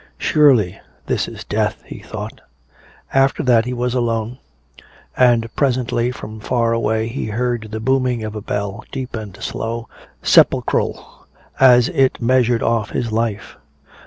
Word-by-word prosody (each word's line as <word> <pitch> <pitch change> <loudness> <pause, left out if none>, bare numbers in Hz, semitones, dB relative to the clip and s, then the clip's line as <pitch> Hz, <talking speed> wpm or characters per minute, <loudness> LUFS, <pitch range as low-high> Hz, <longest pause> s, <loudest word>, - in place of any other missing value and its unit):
"Surely 125 - +3 0.2
this - - -1
is - - -8
death," - - -2
he - - -9
thought. - - -8 0.7
After 135 0 +2
that 120 -3 +4
he 125 - -3
was 125 0 -1
alone. 120 0 -1 0.8
And 120 -2 +4
presently 125 -3 +1
from 110 -3 -8
far 115 +1 0
away 110 -1 0
he 115 0 -4
heard 120 0 -2
the 110 +1 -5
booming 130 -1 0
of 110 -1 -5
a 105 - -5
bell, 100 +2 -4
deep 130 -2 -5
and 105 -4 -7
slow, 115 +2 -4 0.4
sepulchral, - - +2 0.3
as 125 -2 +6
it 135 -1 +1
measured 120 -1 +2
off 115 -2 0
his 115 -2 -3
life. 110 -2 -2
115 Hz, 140 wpm, -19 LUFS, 110-125 Hz, 0.8 s, as